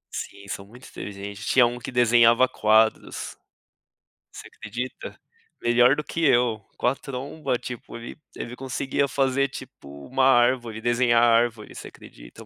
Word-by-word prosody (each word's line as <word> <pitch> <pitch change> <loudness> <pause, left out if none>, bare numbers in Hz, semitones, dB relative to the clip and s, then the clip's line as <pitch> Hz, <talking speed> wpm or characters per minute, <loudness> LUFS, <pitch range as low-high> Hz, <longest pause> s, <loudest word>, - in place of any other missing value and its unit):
Sim, 100 0 -7
são 100 0 -6
muito 125 +5 -15
inteligentes. 100 +1 -8
Tinha 125 -2 +5
um 120 +1 -3
que 125 - -7
desenhava 120 0 +5
quadros, 110 -1 +1 1.0
você - - -11
acredita? 120 +5 -7 0.4
Melhor 120 +3 +4
do 150 - -4
que 165 - -4
eu. 120 -6 +2
Com - - -4
a 125 - +2
tromba, 135 0 -4
tipo, 125 -1 -8
ele 120 0 -9 0.2
ele 120 - -7
conseguia 135 +2 -2
fazer 135 0 +1
tipo, 70 - -11
uma 130 +1 0
árvore, 120 -3 +2
desenhar 120 0 +2
árvore, 115 -2 +2
você - - -8
acredita? - - -14
120 Hz, 145 wpm, -24 LUFS, 110-130 Hz, 1.0 s, Tinha